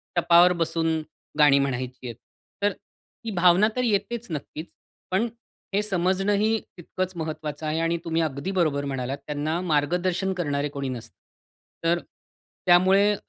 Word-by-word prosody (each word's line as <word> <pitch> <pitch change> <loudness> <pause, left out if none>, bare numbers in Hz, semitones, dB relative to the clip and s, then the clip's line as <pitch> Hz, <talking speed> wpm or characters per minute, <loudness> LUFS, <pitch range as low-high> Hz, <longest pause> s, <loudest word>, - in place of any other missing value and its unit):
टपावर 175 +1 +6
बसून 165 -1 0 0.4
गाणी 145 -2 +6
म्हणायची 130 -2 -3
आहे. 120 - -5 0.5
तर 205 - +4 0.5
ही 225 - -2
भावना 180 +3 +5
तर 250 - 0
येतेच 235 +1 -1
नक्कीच. 155 +1 -5 0.5
पण 200 +6 +2 0.5
हे 205 - +3
समजणं 190 0 +1
ही 215 +2 +2 0.2
तितकंच 185 +2 -4
महत्त्वाचं 155 -1 -5
आहे 155 +1 0
आणि 165 +1 +1
तुम्ही 165 0 0
अगदी 155 +3 -2
बरोबर 155 -7 +1
म्हणालात, 135 0 -3
त्यांना 150 +3 -1
मार्गदर्शन 180 +4 0
करणारे 145 -5 -1
कोणी 140 -1 -4
नसतं. 120 -2 -7 0.7
तर 170 +1 +2 0.7
त्यामुळे 190 +3 +5
165 Hz, 135 wpm, -25 LUFS, 145-185 Hz, 0.7 s, टपावर